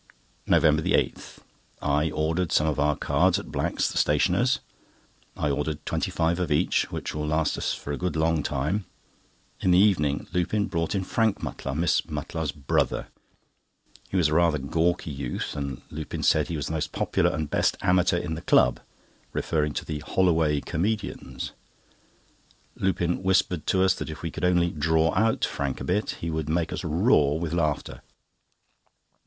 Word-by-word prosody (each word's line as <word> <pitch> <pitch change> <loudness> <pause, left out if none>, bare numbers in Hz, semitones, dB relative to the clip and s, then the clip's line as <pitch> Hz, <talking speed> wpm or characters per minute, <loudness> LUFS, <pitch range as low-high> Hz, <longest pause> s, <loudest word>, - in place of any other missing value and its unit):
NOVEMBER 75 -1 +4
8.—I 75 0 -2
ordered 80 +3 -1
some 75 - +3
of 75 -1 0
our 75 0 +2
cards 85 +8 +2
at 100 - -7
Black's, - - 0
the - - 0
stationers. - - +2 0.8
I 75 - 0
ordered 75 +2 -3
twenty - - -1
five 85 +1 0
of 90 -4 -1
each, 75 - +1
which - - -4
will 75 0 -3
last 80 0 +1
us - - -1
for 75 - -7
a 70 - -2
good 90 -4 -2
long 80 0 +2
time. 75 +10 -1 0.7
In - - 0
the 90 - +6
evening, 85 -8 +3
Lupin 100 +4 +1
brought 85 +4 -2
in 95 - 0
Harry 110 +2 +1
Mutlar, 70 -6 -5
Miss 80 -2 +2
Mutlar's 75 0 -3
brother. 70 -1 -1 1.0
He 95 - -1
was 80 -4 +3
rather 85 0 +3
a - - -6
gawky 80 +4 0
youth, 65 -3 -4
and 70 -3 -4
Lupin 75 0 -5
said - - +3
he 85 - -3
was 75 - -3
the - - -4
most 80 - -2
popular - - +1
and 80 -1 -2
best - - +1
amateur 90 -1 +3
in 85 -2 -3
the 80 - -5
club, 65 -6 +4 0.5
referring 75 -2 0
to - - -4
the 75 - -4
"Holloway 80 -2 +2
Comedians." 100 +3 -3 1.2
Lupin 90 -2 0
whispered 95 -4 +1
to 95 0 +3
us 95 -1 +4
that - - -6
if 75 +1 -8
we 80 - -3
could - - -3
only 90 -1 +3
"draw 80 +1 +2
out" 110 +1 +2
Harry 70 -2 -1
a - - -6
bit, 100 +4 0
he 85 - -2
would 80 -1 -3
make 85 +1 0
us - - -4
roar 80 - +3
with 85 -1 -3
laughter. 80 -4 -1
80 Hz, 170 wpm, -26 LUFS, 75-90 Hz, 1.2 s, the